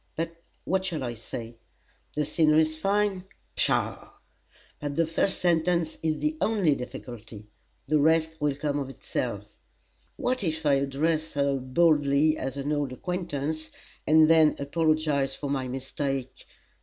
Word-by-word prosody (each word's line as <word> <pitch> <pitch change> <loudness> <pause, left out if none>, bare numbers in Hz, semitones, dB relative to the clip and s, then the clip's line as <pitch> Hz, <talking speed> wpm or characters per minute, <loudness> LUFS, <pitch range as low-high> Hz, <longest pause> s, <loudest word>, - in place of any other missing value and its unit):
But 165 +1 -3 0.3
what 190 +1 0
shall 165 -7 -2
I 120 -1 -3
say? 115 +1 -8 0.6
'The 150 0 +1
scenery's 155 +1 +3
very 155 - -12 0.3
fine?' 185 -2 -9 0.3
Pshaw! - - 0 0.7
But 145 -1 -4
the 165 - +3
first 165 +4 0
sentence 170 -1 +1
is 160 -1 0
the 305 +1 -1
only 200 -9 +3
difficulty 115 -4 -8 0.4
the 155 +1 +3
rest 160 +1 +2
will 145 -2 +1
come 145 0 -1
of 135 -2 -4
itself. 135 - -4 0.7
What 255 -1 -1
if 160 -2 -2
I 145 - +4
address 150 +4 0
her 140 -1 +1
boldly 145 +2 +3
as 135 -2 -4
an 140 +2 -2
old 145 -3 -1
acquaintance, 155 -1 -3 0.4
and 155 0 +6
then 160 -1 +5
apologize 150 -2 +1
for 140 -1 -4
my 135 -2 -1
mistake? 135 0 -4
150 Hz, 145 wpm, -27 LUFS, 140-160 Hz, 0.7 s, and